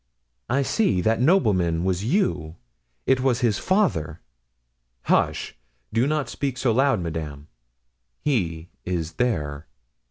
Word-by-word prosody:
I 135 Hz, +3 st, +2 dB
see! 170 Hz, -, +1 dB
That 110 Hz, +4 st, +1 dB
nobleman 95 Hz, -, +3 dB
was 95 Hz, 0 st, 0 dB
you; 115 Hz, -, 0 dB, 0.5 s
it 130 Hz, -1 st, +3 dB
was 130 Hz, -1 st, +1 dB
his 115 Hz, -5 st, +2 dB
father!" 85 Hz, -, +1 dB, 0.8 s
"Hush! -, -, +1 dB, 0.4 s
do 115 Hz, +4 st, +2 dB
not 150 Hz, -1 st, 0 dB
speak 135 Hz, -3 st, -3 dB
so 125 Hz, -, +1 dB
loud, 135 Hz, -1 st, +3 dB
madame; 80 Hz, -3 st, -5 dB, 0.7 s
he 90 Hz, -, -1 dB
is 85 Hz, -3 st, -2 dB
there." 75 Hz, -11 st, -1 dB
110 Hz, 120 wpm, -24 LUFS, 80-135 Hz, 0.8 s, nobleman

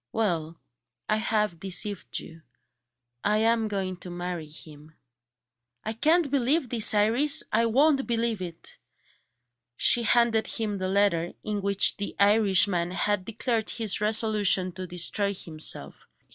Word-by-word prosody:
Well, 170 Hz, -7 st, -2 dB, 0.5 s
I 215 Hz, -, +1 dB
have 215 Hz, -5 st, -1 dB
deceived 195 Hz, +2 st, -2 dB
you 165 Hz, 0 st, -9 dB, 0.8 s
I 210 Hz, +1 st, +2 dB
am 225 Hz, 0 st, +2 dB
going 190 Hz, -3 st, -3 dB
to 180 Hz, -, -9 dB
marry 175 Hz, -2 st, -5 dB
him." 155 Hz, 0 st, -13 dB, 0.9 s
"I 220 Hz, -, -3 dB
can't 310 Hz, +5 st, +2 dB
believe 270 Hz, 0 st, 0 dB
it, 225 Hz, -2 st, +4 dB
Iris! 235 Hz, +8 st, +2 dB
I 230 Hz, +1 st, +2 dB
won't 275 Hz, +3 st, +2 dB
believe 230 Hz, -3 st, -1 dB
it!" 170 Hz, -2 st, -9 dB, 1.0 s
She 240 Hz, -, +4 dB
handed 230 Hz, -1 st, +2 dB
him 210 Hz, -3 st, -3 dB
the 185 Hz, 0 st, -2 dB
letter, 190 Hz, -4 st, +1 dB
in 210 Hz, -1 st, -3 dB
which 200 Hz, 0 st, +3 dB
the 205 Hz, -, -5 dB
Irishman 200 Hz, -4 st, +3 dB
had 190 Hz, +1 st, -1 dB
declared 225 Hz, 0 st, -2 dB
his 215 Hz, -4 st, -1 dB
resolution 210 Hz, -4 st, +1 dB
to 185 Hz, +1 st, -8 dB
destroy 200 Hz, +3 st, -1 dB
himself. 155 Hz, -, -5 dB
205 Hz, 130 wpm, -26 LUFS, 180-225 Hz, 1.0 s, it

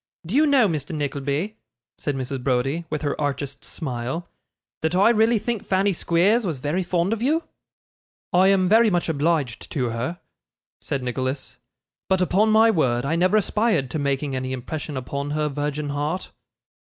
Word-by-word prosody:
Do 175 Hz, -, -5 dB
you 305 Hz, +4 st, +5 dB
know, 270 Hz, -6 st, +5 dB
Mr. 155 Hz, -2 st, -3 dB
Nickleby,' 145 Hz, +7 st, -2 dB, 0.4 s
said 145 Hz, -, -3 dB
Mrs. 130 Hz, 0 st, -4 dB
Browdie, 135 Hz, +6 st, 0 dB
with 155 Hz, 0 st, -3 dB
her 145 Hz, -, 0 dB
archest 140 Hz, -1 st, -3 dB
smile, 135 Hz, +2 st, -4 dB, 0.5 s
'that 160 Hz, +2 st, 0 dB
I 195 Hz, +5 st, +5 dB
really 225 Hz, +1 st, +3 dB
think 220 Hz, 0 st, -2 dB
Fanny 195 Hz, +1 st, +1 dB
Squeers 185 Hz, +8 st, +2 dB
was 170 Hz, -8 st, -2 dB
very 150 Hz, +8 st, -1 dB
fond 180 Hz, +2 st, 0 dB
of 225 Hz, -, -4 dB
you?' 310 Hz, +7 st, +1 dB, 0.9 s
'I 185 Hz, +2 st, +5 dB
am 190 Hz, -1 st, +4 dB
very 220 Hz, +3 st, +5 dB
much 175 Hz, -3 st, 0 dB
obliged 150 Hz, -5 st, 0 dB
to 125 Hz, -4 st, 0 dB
her,' 125 Hz, +10 st, -3 dB, 0.6 s
said 135 Hz, -2 st, -3 dB
Nicholas; 130 Hz, +2 st, -3 dB, 0.5 s
'but 190 Hz, -1 st, +3 dB
upon 190 Hz, +4 st, +3 dB
my 220 Hz, +1 st, +6 dB
word, 125 Hz, -, +1 dB
I 155 Hz, +4 st, 0 dB
never 185 Hz, +5 st, +3 dB
aspired 210 Hz, -, +1 dB
to 155 Hz, -, -2 dB
making 140 Hz, 0 st, -1 dB
any 130 Hz, 0 st, -3 dB
impression 145 Hz, +3 st, -5 dB
upon 140 Hz, +2 st, -4 dB
her 150 Hz, -1 st, +1 dB
virgin 145 Hz, +1 st, -3 dB
heart. 150 Hz, +6 st, -3 dB
155 Hz, 165 wpm, -23 LUFS, 140-195 Hz, 0.9 s, my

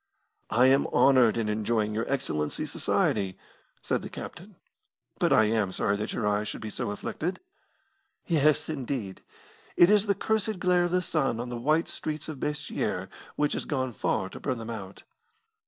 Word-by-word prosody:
"I 125 Hz, +3 st, +4 dB
am 135 Hz, +1 st, +4 dB
honoured 130 Hz, -5 st, +5 dB
in 115 Hz, -2 st, 0 dB
enjoying 105 Hz, 0 st, 0 dB
your 115 Hz, +4 st, -2 dB
Excellency's 75 Hz, -, -2 dB
society," 95 Hz, -3 st, 0 dB, 0.5 s
said -, -, 0 dB
the -, -, -7 dB
captain. -, -, -9 dB, 0.6 s
"But -, -, +2 dB
I 110 Hz, -, +6 dB
am 105 Hz, -3 st, +1 dB
sorry 100 Hz, +2 st, +1 dB
that 105 Hz, +1 st, -3 dB
your -, -, -2 dB
eyes 105 Hz, +1 st, +1 dB
should -, -, -4 dB
be 110 Hz, -1 st, -5 dB
so 120 Hz, -1 st, -3 dB
afflicted." 160 Hz, -, -3 dB, 0.9 s
"Yes, 155 Hz, -3 st, +3 dB
indeed. 130 Hz, -9 st, -4 dB, 0.6 s
It 175 Hz, +3 st, +7 dB
is 210 Hz, 0 st, +4 dB
the 200 Hz, -, +3 dB
cursed 215 Hz, 0 st, 0 dB
glare 180 Hz, -1 st, +3 dB
of 175 Hz, -, -2 dB
the 180 Hz, 0 st, +2 dB
sun 135 Hz, -9 st, 0 dB
on 120 Hz, +1 st, -4 dB
the 120 Hz, -, -4 dB
white 155 Hz, +7 st, +2 dB
streets 155 Hz, -1 st, -5 dB
of 155 Hz, -4 st, -6 dB
Basseterre 150 Hz, +1 st, -2 dB, 0.3 s
which 150 Hz, 0 st, +1 dB
has -, -, -3 dB
gone 130 Hz, -4 st, -2 dB
far 95 Hz, -2 st, -1 dB
to -, -, -9 dB
burn 130 Hz, -3 st, -2 dB
them 115 Hz, 0 st, -6 dB
out." 100 Hz, -4 st, -8 dB
125 Hz, 175 wpm, -28 LUFS, 110-155 Hz, 0.9 s, It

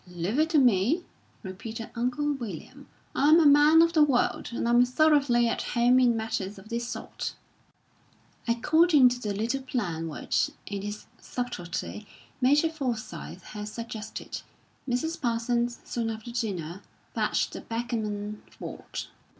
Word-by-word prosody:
"Leave 180 Hz, -, -2 dB
it 315 Hz, +1 st, +3 dB
to 320 Hz, -, +3 dB
me," 250 Hz, -, +3 dB, 0.4 s
repeated 220 Hz, +4 st, -7 dB
Uncle 250 Hz, +5 st, 0 dB
William. 240 Hz, -7 st, -8 dB, 0.3 s
"I'm 305 Hz, +4 st, +6 dB
a 325 Hz, -, +4 dB
man 295 Hz, +3 st, +7 dB
of 335 Hz, 0 st, +1 dB
the 315 Hz, -, +4 dB
world, 270 Hz, -4 st, +1 dB
and 235 Hz, -, -2 dB
I'm 240 Hz, +1 st, +6 dB
thoroughly 255 Hz, -2 st, +3 dB
at 230 Hz, -, -1 dB
home 245 Hz, +1 st, +3 dB
in 240 Hz, -2 st, +4 dB
matters 210 Hz, -3 st, -3 dB
of 195 Hz, +3 st, -13 dB
this 235 Hz, 0 st, -2 dB
sort." -, -, -5 dB, 1.1 s
According 295 Hz, +4 st, +5 dB
to 245 Hz, 0 st, -3 dB
the 210 Hz, -, -2 dB
little 230 Hz, +7 st, -1 dB
plan 185 Hz, -11 st, -3 dB
which, 155 Hz, -, 0 dB, 0.2 s
in 200 Hz, -1 st, -4 dB
his 205 Hz, +1 st, -6 dB
subtlety, 175 Hz, -, -5 dB, 0.3 s
Major 290 Hz, +5 st, +4 dB
Forsyth 255 Hz, -8 st, -5 dB
had 210 Hz, -1 st, -7 dB
suggested, 220 Hz, -1 st, -6 dB, 0.5 s
Mrs. 320 Hz, +7 st, -1 dB
Parsons, 235 Hz, 0 st, 0 dB
soon 230 Hz, -2 st, -2 dB
after 225 Hz, +2 st, -6 dB
dinner, 195 Hz, -7 st, -3 dB, 0.3 s
fetched -, -, 0 dB
the -, -, -6 dB
backgammon 215 Hz, -3 st, -3 dB, 0.2 s
board. -, -, -6 dB
235 Hz, 140 wpm, -27 LUFS, 210-270 Hz, 1.1 s, man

